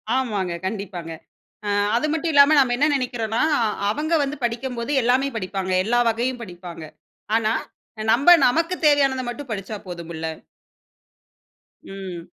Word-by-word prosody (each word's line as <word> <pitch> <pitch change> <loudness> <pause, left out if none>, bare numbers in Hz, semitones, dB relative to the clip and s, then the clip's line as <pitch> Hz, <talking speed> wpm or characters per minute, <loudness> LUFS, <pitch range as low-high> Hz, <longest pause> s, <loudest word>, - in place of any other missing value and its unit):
ஆமாங்க, 210 -9 -1
கண்டிப்பாங்க. 190 -4 -5 0.6
அ - - 0 0.3
அது 245 +6 +1
மட்டும் 325 +1 -1
இல்லாம 285 +2 +7
நாம்ப 255 -3 +3
என்ன 290 +4 +3
நினைக்கிறோம்னா, 235 -4 -2 0.5
அவங்க 310 +7 -2
வந்து 280 +2 -4
படிக்கும்போது 240 +1 -3
எல்லாமே 255 +3 +2
படிப்பாங்க. 190 -1 -3
எல்லா 240 +3 +1
வகையும் 240 +2 -2
படிப்பாங்க. 175 -4 -9 0.5
ஆனா 220 0 +1 0.6
நம்ப 275 +9 +5 0.2
நமக்குத் 330 +6 0
தேவையானதை 275 -3 +3
மட்டும் 270 +2 -7
படிச்சா 205 +1 -4
போதுமுல்ல. 170 -2 -6 1.6
ம். 190 -3 -7
235 Hz, 120 wpm, -22 LUFS, 195-275 Hz, 1.6 s, இல்லாம